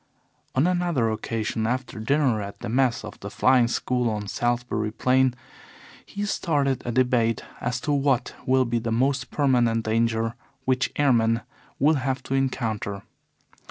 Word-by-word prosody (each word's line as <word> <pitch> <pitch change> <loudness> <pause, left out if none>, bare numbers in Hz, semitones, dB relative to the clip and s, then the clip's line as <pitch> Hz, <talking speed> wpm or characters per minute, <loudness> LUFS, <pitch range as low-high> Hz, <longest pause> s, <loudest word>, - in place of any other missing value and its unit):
On 130 +4 +3
another 175 -10 +1
occasion 110 0 -2
after 125 -2 -3
dinner, 130 -1 +1
at 100 0 -8
the 120 - -4
mess 125 0 +1
of - - -10
the - - -7
Flying 125 -2 +4
School 125 0 0
on 105 -1 -3
Salisbury 120 -1 -1
Plain, 130 +2 +2 0.7
he 205 +1 -5
started 145 -9 0
a 120 - -3
debate 120 -2 +2 0.2
as 125 0 -2
to 150 - -1
what 135 -3 +1
will 130 0 +4
be 120 0 0
the 115 0 -3
most 130 +3 +1
permanent 120 -5 +2
danger 115 0 +1 0.3
which 130 0 +1
airmen 115 -5 +3 0.4
will 150 +2 +3
have 130 0 -2
to - - -4
encounter. 110 -7 -1
125 Hz, 150 wpm, -25 LUFS, 115-135 Hz, 0.7 s, Flying